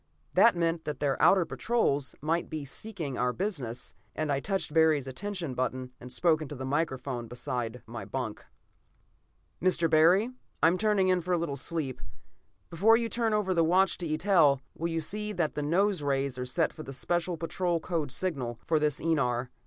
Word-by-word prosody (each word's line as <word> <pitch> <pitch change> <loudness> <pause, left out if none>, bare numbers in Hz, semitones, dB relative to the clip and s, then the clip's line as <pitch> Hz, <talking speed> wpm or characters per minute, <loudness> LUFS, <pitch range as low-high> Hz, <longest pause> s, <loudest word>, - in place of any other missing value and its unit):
That 230 -4 +6
meant 165 -1 0
that 150 -3 -4
their 140 -3 0
outer 190 -3 +5
patrols 145 - 0
might 165 +3 -1
be 155 -3 -4
seeking 160 - -5
our 125 0 +2
business, 140 - -4 0.2
and 155 -1 -1
I 135 - +1
touched 190 -1 -2
Barry's 160 -4 +4
attention 170 +2 -4
button, 130 0 -2
and 125 - -10
spoke 160 +4 +2
into 145 -1 -6
the 130 0 -5
microphone 130 -4 -2
beside 120 -1 -4
my 115 0 -7
bunk. 125 -5 -5 1.2
"Mr. 175 -2 +3
Barry? 175 +9 +4 0.3
I 165 - +8
am 180 +2 0
turning 210 -3 +2
in 185 -1 +3
for 180 +2 -1
a - - +3
little 165 -4 -2
sleep. 140 - -2 0.7
Before 210 +7 +5
you 230 -1 -2
turn 230 -1 0
over 210 -3 +1
the 165 -2 +3
watch 180 +3 +3
to 175 - -3
Eitel, 155 -4 +3
will 165 - -3
you 165 -1 -1
see 210 +6 -3
that 170 -5 0
the 150 - -3
nose 185 +5 +1
rays 140 -2 0
are 125 - -3
set 165 +6 +1
for - - -9
the 135 -2 -8
Special 175 +5 -1
Patrol 170 +1 -1
code 160 -5 -2
signal 135 -9 -2
for 160 -2 +2
this 150 -2 0
enar. 130 -6 0
160 Hz, 185 wpm, -29 LUFS, 135-180 Hz, 1.2 s, I